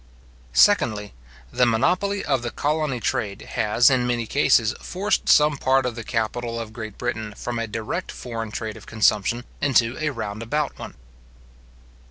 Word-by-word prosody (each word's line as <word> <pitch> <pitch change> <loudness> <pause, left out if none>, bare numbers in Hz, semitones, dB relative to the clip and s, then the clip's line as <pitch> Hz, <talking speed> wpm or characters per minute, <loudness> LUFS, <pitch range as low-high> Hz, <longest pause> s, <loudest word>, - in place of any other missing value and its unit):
Secondly, 105 - +3 0.4
The 125 0 +3
monopoly 185 - +1
of 135 -4 +1
the 120 - -3
colony 150 -1 -1
trade, 110 -6 -2
has, 115 +5 +4
in 125 -2 +2
many 120 -1 0
cases, 115 -3 +3
forced 200 +4 -1
some 150 -1 +5
part 130 0 +2
of 125 - -1
the 115 0 -7
capital 115 +1 -2
of 110 -1 -7
Great 110 -3 -7
Britain 110 -4 -4
from 120 -1 -4
a 115 - -2
direct 110 +1 -4
foreign 115 -3 -6
trade 110 0 -5
of - - -14
consumption, 110 +2 +1 0.2
into 125 -3 +3
a 155 0 0
round 110 -5 -5
about 150 +6 -2
one. - - -8
120 Hz, 160 wpm, -23 LUFS, 110-130 Hz, 0.4 s, some